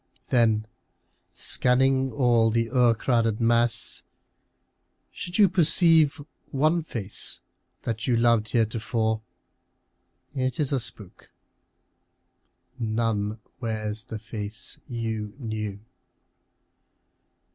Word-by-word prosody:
Then, 110 -3 +3 0.7
scanning 130 +1 +2
all 120 -4 +3
the 115 0 0
o'ercrowded 115 -2 +2
mass, 115 0 +2 1.1
should 175 +1 -5
you 205 -2 +7
Perceive 165 -3 +4 0.3
one 155 +5 +2
face 110 -10 -5 0.4
that 115 +1 -3
you 120 -2 +3
loved 115 -2 +3
heretofore, 110 -1 0 1.1
It 130 -1 -2
is 150 -3 0
a 135 - +1
spook. 105 -5 -9 1.5
None 110 -2 -1 0.2
wears 110 -2 -3
the 110 -3 -6
face 105 0 -6
you 110 -4 -4
knew. 110 -5 -4
115 Hz, 85 wpm, -26 LUFS, 110-130 Hz, 1.5 s, you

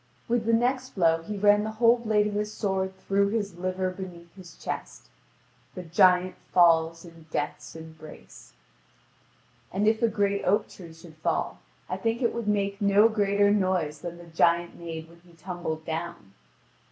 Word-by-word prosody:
With 235 -2 0
the 230 - +3
next 255 +2 0
blow 165 -3 +3
he 205 +5 -6
ran 205 +1 +4
the 220 0 -4
whole 235 +2 +4
blade 215 -3 +2
of 210 - -2
his 210 +1 -2
sword 190 -3 -2
through 200 +1 +1
his 200 -4 -3
liver 185 0 -1
beneath 180 -2 -10
his 185 -3 -14
chest; - - -6 0.7
the 180 - -6
giant 180 +2 +4 0.2
falls 165 -1 +4
in 165 -2 -15
death's 145 +1 -4
embrace. 160 -1 -13 1.2
And 200 +3 0
if 220 0 +2
a 230 - +4
great 200 -2 0
oak 200 +3 +2
tree 170 -3 -12
should 160 -1 -15
fall, 155 - -2 0.3
I - - -3
think 230 +2 -1
it 235 - +1
would 235 -2 -4
make 200 0 0
no 200 +2 +5
greater 205 -2 +2
noise 185 -7 0
than 175 0 -6
the 175 - -12
giant 170 +1 +2
made 165 -1 -7
when 170 +1 -18
he 175 0 -21
tumbled 165 -2 -5
down. 165 - -5
185 Hz, 170 wpm, -27 LUFS, 170-210 Hz, 1.2 s, no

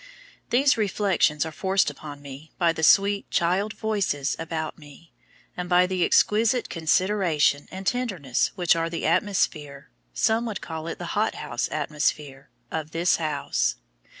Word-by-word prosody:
These 270 +1 +3
reflections 190 -7 +1
are 160 - -5
forced 190 0 +1
upon 145 0 -10
me 140 +3 -10
by 170 -2 +2
the 160 - -5
sweet 200 +4 +4
child 190 +5 +1
voices 195 -10 -1
about 160 -1 -4
me, 150 +2 -16 0.4
and 180 0 -5
by 180 0 +5
the 185 -1 0
exquisite 225 +7 +2
consideration 165 -3 +1
and 190 +1 -8
tenderness 190 - 0
which 175 -3 +3
are 165 0 -1
the 165 - -4
atmosphere 155 - -1 0.2
(some 220 - +1
would 210 -4 -4
call 160 0 -6
it - - -5
the - - -5
hothouse - - -1
atmosphere) 145 -2 -2 0.2
of 155 -1 -4
this 170 +2 +2
house. 150 -3 -1
170 Hz, 145 wpm, -25 LUFS, 150-195 Hz, 0.4 s, by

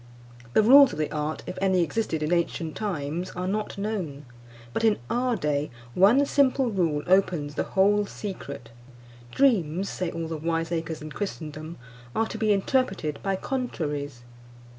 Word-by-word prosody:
The 215 - +5
rules 270 +3 +8
of - - -6
the 155 -1 -1
art, 150 +1 -3
if - - -6
any 190 -2 +3
existed 160 -2 -1
in 155 +3 +1
ancient 170 -2 -1
times, 175 -3 -3
are 180 +1 -3
not 210 +2 -2
known; 185 -9 -4 0.5
but 225 - -1
in 220 -2 +4
our 245 0 +1
day, 150 -5 -1 0.2
one 225 +10 +5
simple 270 -3 +2
rule 165 -7 0
opens 175 -6 +2
the - - -1 0.2
whole 205 +1 +4
secret. 140 - -7 0.6
Dreams, 195 - +2
say 180 -2 -2
all 165 -1 -4
the 160 -1 -4
wiseacres 165 0 -2
in 155 - -7
Christendom, 155 -4 -6 0.4
are 225 - +2
to - - -6
be 215 -1 +2
interpreted 195 - 0
by 195 -1 0
contraries. 150 - -3
180 Hz, 155 wpm, -26 LUFS, 155-210 Hz, 0.6 s, rules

